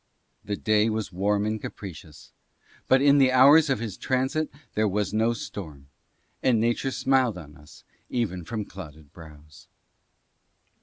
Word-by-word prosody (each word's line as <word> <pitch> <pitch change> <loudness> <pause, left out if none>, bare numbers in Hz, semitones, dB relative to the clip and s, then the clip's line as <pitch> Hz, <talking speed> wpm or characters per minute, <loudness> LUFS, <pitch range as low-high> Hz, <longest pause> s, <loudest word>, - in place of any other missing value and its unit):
The 105 - -3
day 110 +1 +2
was 110 -2 -3
warm 100 +3 0
and 110 0 -2
capricious, 80 -5 -10 0.6
but 130 +1 +4
in 145 0 +5
the 130 -1 +4
hours 140 +4 +6
of 135 - +1
his 110 -3 -6
transit 130 +5 -1 0.2
there 110 0 +1
was 105 0 -2
no 110 +2 +2
storm, 75 -11 -8 0.5
and 120 -4 +2
nature 120 +4 0
smiled 130 -5 +1
on 75 -4 -11
us 75 -1 -17 0.3
even 95 -8 -2
from 110 +3 -5
clouded 80 -7 -12
brows. 75 -3 -15
105 Hz, 145 wpm, -25 LUFS, 90-130 Hz, 0.6 s, hours